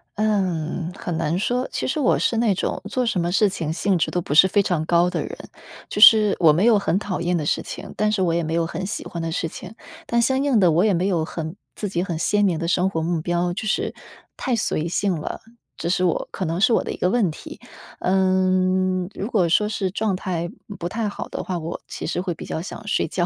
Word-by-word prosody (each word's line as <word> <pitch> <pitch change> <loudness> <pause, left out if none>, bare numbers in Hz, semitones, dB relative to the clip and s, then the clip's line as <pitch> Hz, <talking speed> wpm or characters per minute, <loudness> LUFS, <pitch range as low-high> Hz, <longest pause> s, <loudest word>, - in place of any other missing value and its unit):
嗯， 180 -5 -1
很 175 - -4
难 165 +1 0
说。 245 +6 0
其 - - -2
实 300 - -1
我 260 - +3
是 230 - 0
那 225 -4 +3
种 - - -2
做 250 +1 0
什 210 -6 0
么 175 +1 -1
事 210 +2 +4
情 165 -5 -3
兴 185 +3 +1
致 - - 0
都 180 - -1
不 145 - -4
是 175 +5 +7
非 200 +1 +2
常 175 -5 0
高 175 +1 +3
的 175 -2 -2
人， - - -7 0.5
就 210 - -3
是 215 -2 +8
我 165 -3 +6
没 180 +7 +2
有 225 -4 +5
很 190 -2 0
讨 200 -3 -3
厌 175 0 +1
的 150 - -3
事 - - +1
情， - - -8
但 215 0 +1
是 205 - 0
我 170 - +1
也 170 - +1
没 160 +1 -3
有 170 - +1
很 170 +3 -4
喜 215 - -4
欢 170 - -5
的 165 0 -3
事 165 - -1
情。 190 +6 -10 0.3
但 235 - +1
相 265 +3 +2
应 270 -6 +3
地 180 -4 +5
我 165 +4 +3
也 210 -2 +3
没 175 +2 0
有 170 -5 +1
很 160 +1 -5 0.2
自 210 - -3
己 175 -2 -1
很 170 -4 -3
鲜 205 +5 +1
明 180 -4 +1
的 170 +1 -3
生 180 +2 +2
活 165 -4 -2
目 165 0 -1
标， 175 +1 0
就 215 +3 -4
是 - - 0 0.4
太 255 -4 -1
随 170 -7 -1
性 190 +3 0
了， - - -5 0.4
这 170 - -4
是 180 +1 +1
我 175 - 0
可 190 - -3
能 165 +1 -2
是 220 +4 +4
我 - - +2
的 - - -4
一 - - -6
个 180 - +1
问 225 -8 +2
题。 155 - -9 0.4
嗯， 185 0 +2
如 200 - -4
果 195 -8 +2
说 210 +5 +2
是 195 -3 -2
状 210 -1 0
态， 175 -2 -3 0.2
嗯， 205 - -7
不 175 - -4
太 220 +2 -2
好 205 - -5
的 - - -4
话， 180 -2 -3
我 165 +1 -5
其 - - -6
实 175 - -1
会 180 -2 -2
比 165 - -10
较 - - -4
想 210 +5 -8
睡 - - +1
觉。 175 - -1
185 Hz, 275 characters per minute, -22 LUFS, 170-205 Hz, 0.5 s, 是